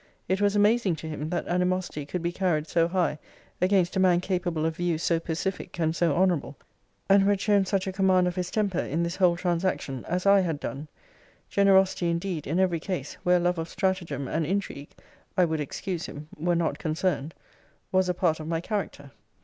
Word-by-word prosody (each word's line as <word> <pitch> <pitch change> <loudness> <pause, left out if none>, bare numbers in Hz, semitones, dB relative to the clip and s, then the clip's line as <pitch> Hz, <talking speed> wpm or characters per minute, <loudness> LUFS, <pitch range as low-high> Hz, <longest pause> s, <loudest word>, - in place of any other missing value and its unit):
It 190 +2 0
was 205 0 +2
amazing 205 -3 +3
to 160 +1 -8
him, 155 0 -4
that 175 - -2
animosity 180 -4 -1
could 175 +2 -4
be 170 - 0
carried 175 -4 0
so 165 -1 +2
high 170 -4 0 0.4
against 185 0 +2
a - - +1
man 180 -2 +4
capable 175 -3 -1
of 160 0 -2
views 170 -2 -1
so 165 -1 +2
pacific 170 +3 -4
and 160 -1 +1
so 165 -4 +2
honourable, 170 -7 +1 0.5
and 195 0 +6
who 195 - +3
had 200 -1 +2
shown 200 -2 +2
such 195 -1 0
a 190 - -2
command 185 -1 +3
of 180 - -2
his 180 -1 -2
temper, 200 -5 0
in 165 +4 -1
this 170 +1 -3
whole 180 -3 +3
transaction, 175 -7 -1
as 180 +2 -2
I 200 0 +6
had 165 -6 -1
done. 145 +2 -5 0.6
Generosity, 190 -3 +3
indeed, 170 -2 -2
in 165 +6 0
every 180 -3 +2
case, 165 -5 -4
where 180 0 +4
love 175 0 0
of 165 +1 -4
stratagem 170 -9 -2
and 160 +4 -1
intrigue 165 -4 -3 0.5
(I 180 - +5
would 160 -1 -2
excuse 170 +4 -4
him) 150 +2 -9
were 175 +3 0
not 170 -1 -1
concerned, 160 -1 -1 0.6
was 185 -1 +2
a 180 - 0
part 165 -3 +1
of 155 - -6
my 165 0 -1
character. 170 -7 -4
175 Hz, 200 wpm, -27 LUFS, 160-190 Hz, 0.6 s, and